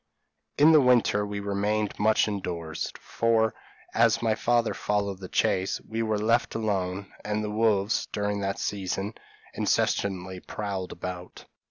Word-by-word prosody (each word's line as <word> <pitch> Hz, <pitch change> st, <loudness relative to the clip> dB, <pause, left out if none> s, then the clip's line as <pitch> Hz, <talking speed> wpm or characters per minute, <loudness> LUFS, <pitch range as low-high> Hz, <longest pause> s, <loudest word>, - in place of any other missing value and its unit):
In 150 Hz, +3 st, +7 dB
the 155 Hz, -2 st, +7 dB
winter 120 Hz, -5 st, +4 dB
we 100 Hz, 0 st, -4 dB
remained 100 Hz, +1 st, -1 dB
much 110 Hz, +1 st, +3 dB
indoors, 85 Hz, -6 st, -4 dB
for, 115 Hz, -1 st, +1 dB, 0.4 s
as 115 Hz, -1 st, +4 dB
my 110 Hz, -1 st, +3 dB
father 120 Hz, +1 st, +1 dB
followed 100 Hz, -2 st, -1 dB
the 95 Hz, -, -7 dB
chase, 95 Hz, +1 st, +1 dB
we 115 Hz, +1 st, -2 dB
were 110 Hz, -1 st, 0 dB
left 115 Hz, +3 st, +1 dB
alone, 100 Hz, -3 st, -2 dB
and 105 Hz, +1 st, -1 dB
the 105 Hz, -, -3 dB
wolves, 105 Hz, -1 st, +1 dB
during 105 Hz, 0 st, -1 dB
that 100 Hz, 0 st, -2 dB
season, 100 Hz, +1 st, -2 dB, 0.4 s
incessantly 95 Hz, -2 st, 0 dB
prowled 100 Hz, -2 st, -4 dB
about. 90 Hz, -1 st, -7 dB
105 Hz, 140 wpm, -27 LUFS, 95-110 Hz, 0.4 s, In